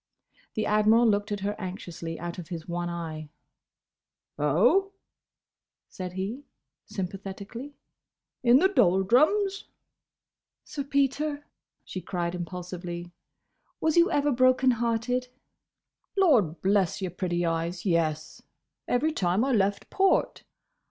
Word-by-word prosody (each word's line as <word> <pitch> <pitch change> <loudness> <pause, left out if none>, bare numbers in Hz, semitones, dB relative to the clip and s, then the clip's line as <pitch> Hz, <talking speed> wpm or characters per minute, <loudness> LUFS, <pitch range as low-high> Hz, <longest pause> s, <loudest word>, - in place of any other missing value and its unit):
The 215 - 0
Admiral 215 +3 +4
looked 205 -1 +1
at 205 -1 -2
her 205 +1 -2
anxiously 175 -4 -6
out 175 +2 -5
of 170 - -8
his 170 -3 -7
one 175 0 -3
eye. 160 -3 -5 1.1
"Oh?" 240 - +3 1.0
said 180 -1 -6
he, 205 +10 -4 0.4
sympathetically, 200 +7 -6 0.7
"In 240 0 +6
the 370 - +5
doldrums?" 305 - +3 1.0
"Sir 280 -2 -5
Peter," 285 +1 0 0.4
she 185 - -6
cried, 175 -2 -3
impulsively, 175 0 -6 0.7
"was 315 -1 +1
you 345 +2 +5
ever 290 0 +2
broken 255 +1 +4
hearted?" 240 +2 -1 0.9
"Lord 235 - +3
bless 195 -1 +2
your 185 -3 -3
pretty 175 -1 -1
eyes, 170 +2 -2
yes! 160 -4 0 0.5
Every 300 +6 +1
time 195 - +1
I 270 - 0
left 200 -3 0
port." 385 0 +1
200 Hz, 110 wpm, -27 LUFS, 175-255 Hz, 1.1 s, In